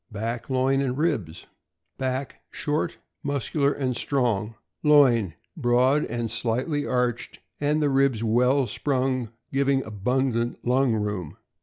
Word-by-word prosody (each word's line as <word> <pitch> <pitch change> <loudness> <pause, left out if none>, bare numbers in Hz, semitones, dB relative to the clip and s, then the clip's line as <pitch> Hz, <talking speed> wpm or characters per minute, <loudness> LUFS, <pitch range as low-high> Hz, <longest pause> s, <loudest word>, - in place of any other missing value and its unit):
Back, 115 +4 -4
loin, 135 +1 +2
and 130 -1 -1
ribs. 130 - -1 0.3
— - - -54
Back 130 +1 -3
short, 150 0 -2 0.2
muscular, 140 +1 0
and 130 -3 -2
strong. 115 -5 0 0.3
Loin 120 - +4 0.2
broad 130 0 +3
and 120 -2 -3
slightly 125 +6 -1
arched, 125 -2 -1 0.2
and 150 +1 +1
the 145 - +3
ribs 135 -4 +2
well 125 +4 +3
sprung, 130 0 -1 0.2
giving 135 -1 +2
abundant 120 +3 -1
lung 125 0 +3
room. 105 -7 -3
130 Hz, 125 wpm, -25 LUFS, 115-140 Hz, 0.3 s, Loin